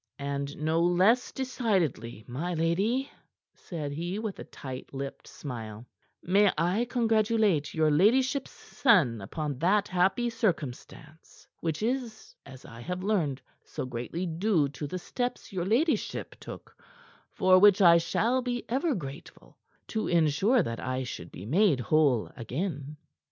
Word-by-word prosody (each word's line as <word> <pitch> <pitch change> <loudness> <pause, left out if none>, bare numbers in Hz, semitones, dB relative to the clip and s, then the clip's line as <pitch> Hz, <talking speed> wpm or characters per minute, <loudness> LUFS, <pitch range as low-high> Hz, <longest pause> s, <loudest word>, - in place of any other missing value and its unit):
"And 140 0 -4
no 160 +2 +1
less 185 +8 +3
decidedly, 185 - -1
my 165 +9 -3
lady," 195 +12 0 0.4
said 155 -5 -6
he 170 +6 -3
with 215 -2 -4
a - - -5
tight 130 -2 -9
lipped 135 0 -6
smile, 115 -5 -7 0.4
"may 200 +2 +4
I 180 +9 +1
congratulate 220 - +2
your 155 -1 +3
ladyship's 255 - +3
son 155 - +2
upon 145 +6 -4
that 195 +5 +2
happy 190 +7 +1
circumstance, 160 - -4
which 165 +3 -2
is 235 -2 -3
as 130 -1 -12
I 115 +1 -11
have 180 +6 -4
learned 155 -11 0 0.2
so - - -5
greatly 125 +8 -4
due 170 -3 +1
to 145 +2 -6
the 185 - -4
steps 245 +4 -4
your 175 -2 -2
ladyship 260 - 0
took - - -10 0.6
for 185 -1 +5
which 200 0 +6
I 170 -3 +7
shall 235 +9 +1
be 245 -1 -3
ever 275 +4 +1
grateful 140 -4 -9 0.3
to 220 - -2
ensure 175 - +3
that 115 0 -4
I 130 0 -2
should 105 -8 -7
be 95 - -9
made 165 - +3
whole 135 -2 +2
again." 145 - -4
175 Hz, 140 wpm, -28 LUFS, 140-215 Hz, 0.6 s, I